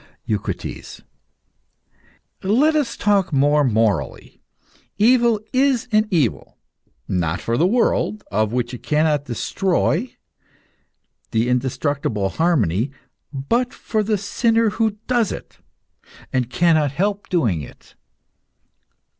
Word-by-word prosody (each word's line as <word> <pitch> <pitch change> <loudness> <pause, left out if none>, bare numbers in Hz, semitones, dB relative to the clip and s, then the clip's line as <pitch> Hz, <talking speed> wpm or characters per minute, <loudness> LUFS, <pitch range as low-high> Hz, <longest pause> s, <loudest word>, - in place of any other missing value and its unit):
EUCRITES. - - -5 1.4
Let 260 +11 +3
us 285 -6 0
talk 200 -3 +2
more 145 +1 +3
morally. 110 - -1 0.6
Evil 235 0 +4
is 260 -2 +2
an 215 0 +3
evil 155 - -1 0.5
not 85 -2 -1
for 115 - -2
the 165 +9 +3
world, 215 -1 +1
of 110 +1 +1
which 120 0 -2
it 125 - -7
cannot 150 -1 +1
destroy 175 - -1 1.1
the 115 +1 0
indestructible 125 -4 -1
harmony 120 - +1 0.4
but 230 - -1
for 220 - -2
the 210 0 0
sinner 225 +2 +1
who 220 -2 0
does 240 -4 +1
it, - - -9 0.7
and 125 -2 0
cannot 160 0 +3
help 200 +6 -2
doing 115 - +1
it. 70 - -13
165 Hz, 105 wpm, -21 LUFS, -, 1.4 s, Evil